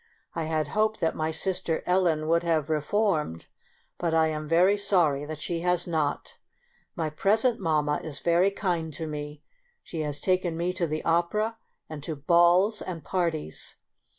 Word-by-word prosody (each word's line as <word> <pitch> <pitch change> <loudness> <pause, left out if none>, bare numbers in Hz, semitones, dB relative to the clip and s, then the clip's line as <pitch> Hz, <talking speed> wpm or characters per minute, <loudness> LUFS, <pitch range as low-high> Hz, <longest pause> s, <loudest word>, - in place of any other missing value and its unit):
I 165 - -2
had 155 -2 -1
hoped 215 +3 +1
that 165 - +1
my 155 0 -1
sister 160 0 -1
Ellen 175 -4 +2
would 170 +1 +3
have 160 -3 0
re 155 -1 +1
formed, 155 - 0 0.5
but 165 -2 0
I 160 -1 +4
am 155 -1 -4
very 180 +5 +4
sorry 170 -8 +2
that 155 0 -6
she 170 -1 -2
has 180 0 +1
not. 155 -4 -2 0.6
My 160 -3 -2
present 220 +9 +2
mamma 150 -4 +1
is 155 -3 -4
very 175 +3 +3
kind 175 -5 -2
to 160 - -5
me; 150 -1 -6 0.4
she 165 - -7
has 145 -1 -3
taken 180 -1 0
me 175 +2 -1
to 175 -2 -1
the 155 0 -4
opera 210 +7 +1 0.3
and 155 -2 -7
to 155 +2 -4
balls 175 +7 +4
and 170 -4 -6
parties. 165 - -3
165 Hz, 170 wpm, -27 LUFS, 155-180 Hz, 0.6 s, I